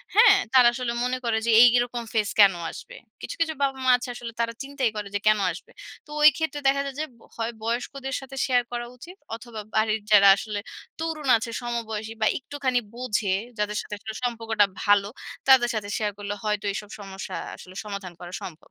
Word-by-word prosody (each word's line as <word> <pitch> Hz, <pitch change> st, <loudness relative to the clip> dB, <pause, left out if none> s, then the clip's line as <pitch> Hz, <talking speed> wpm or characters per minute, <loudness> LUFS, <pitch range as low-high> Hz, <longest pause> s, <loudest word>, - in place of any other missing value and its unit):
হ্যাঁ? 430 Hz, -2 st, +8 dB, 0.2 s
তারা 250 Hz, -2 st, +8 dB
আসলে 240 Hz, -1 st, -2 dB
মনে 250 Hz, +1 st, 0 dB
করে 225 Hz, -1 st, +1 dB
যে, 235 Hz, -, +2 dB
এই 245 Hz, -, +10 dB
এরকম 240 Hz, -1 st, -1 dB
phase 215 Hz, -2 st, 0 dB
কেন 200 Hz, -2 st, +8 dB, 0.2 s
আসবে? -, -, -11 dB, 0.3 s
কিছু, -, -, -6 dB
কিছু 320 Hz, -1 st, +1 dB
বাবা-মা 265 Hz, -2 st, +2 dB
আছে 245 Hz, -, -7 dB
আসলে 235 Hz, -1 st, -7 dB
তারা 230 Hz, 0 st, 0 dB
চিন্তাই 270 Hz, -3 st, -1 dB
করে 210 Hz, -1 st, -4 dB
যে, -, -, +1 dB
কেন 215 Hz, -1 st, +5 dB
আসবে? 175 Hz, -, -11 dB, 0.3 s
তো -, -, -24 dB
ওই 305 Hz, -, +10 dB
ক্ষেত্রে 320 Hz, -2 st, -2 dB
দেখা 275 Hz, +1 st, +3 dB
যায় 275 Hz, -1 st, -5 dB
যে, 310 Hz, -, 0 dB, 0.3 s
হয় 230 Hz, +1 st, -2 dB
বয়স্কদের 260 Hz, +3 st, -3 dB
সাথে 270 Hz, 0 st, -10 dB
share 245 Hz, -2 st, +2 dB
করা 240 Hz, 0 st, -3 dB
উচিত 355 Hz, +9 st, -12 dB, 0.2 s
অথবা 230 Hz, -2 st, -8 dB
বাড়ির 220 Hz, 0 st, +2 dB
যারা 200 Hz, -1 st, +8 dB
আসলে 205 Hz, +1 st, -4 dB, 0.4 s
তরুণ 320 Hz, -3 st, -3 dB
আছে, 230 Hz, +1 st, -5 dB
সমবয়সী 225 Hz, -2 st, -4 dB
বা 215 Hz, -, +4 dB
একটুখানি 265 Hz, -2 st, -1 dB, 0.2 s
বোঝে, 215 Hz, -6 st, 0 dB, 0.2 s
যাদের 210 Hz, 0 st, -1 dB
সাথে 210 Hz, -, -7 dB, 0.3 s
সম্পর্কটা 225 Hz, -3 st, +1 dB, 0.2 s
ভালো, 205 Hz, -1 st, +4 dB, 0.4 s
তাদের 260 Hz, -3 st, +6 dB
সাথে 205 Hz, -2 st, -3 dB
শেয়ার 210 Hz, -1 st, -1 dB
করলে 205 Hz, 0 st, -4 dB
হয়তো 210 Hz, -1 st, -1 dB
এইসব 210 Hz, -1 st, -6 dB
সমস্যা 195 Hz, -1 st, -7 dB, 0.2 s
আসলে 185 Hz, 0 st, -13 dB
সমাধান 200 Hz, -3 st, -6 dB
করা 175 Hz, 0 st, -9 dB
সম্ভব। 165 Hz, -4 st, -7 dB
235 Hz, 190 wpm, -25 LUFS, 210-260 Hz, 0.4 s, এই